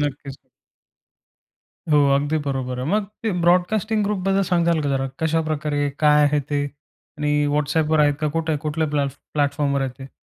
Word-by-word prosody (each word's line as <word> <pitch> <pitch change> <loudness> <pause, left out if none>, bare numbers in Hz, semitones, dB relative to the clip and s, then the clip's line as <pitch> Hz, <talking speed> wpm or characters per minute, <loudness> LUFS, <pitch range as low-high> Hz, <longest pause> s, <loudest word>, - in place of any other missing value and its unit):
नक्कीच. 140 -1 -4 1.5
हो, 150 -1 +4 0.2
अगदी 145 +3 0
बरोबर 130 -2 -3
आहे. 130 - -3
मग 210 0 +2 0.2
ते 225 - 0
ब्रॉडकास्टिंग 210 +5 +2
ग्रुपबद्दल 195 -1 0
सांगताल 170 -2 +2
का 145 - -1
जरा? 135 -1 -1
कशाप्रकारे? 155 -2 0
काय 150 0 +5
आहे 145 0 +2
ते? 145 -1 +1 0.6
आणि 150 0 0 0.2
WhatsAppवर 155 +1 +1
आहे 145 -1 +4
का? 155 - +1
कुठे 160 -1 -1
कुठल्या 155 +1 -1
प्लॅटफ् 140 -1 -1 0.2
प्लॅटफॉर्मवर 140 -1 0
आहे - - -4
ते? 135 - -9
150 Hz, 155 wpm, -22 LUFS, 145-165 Hz, 1.5 s, काय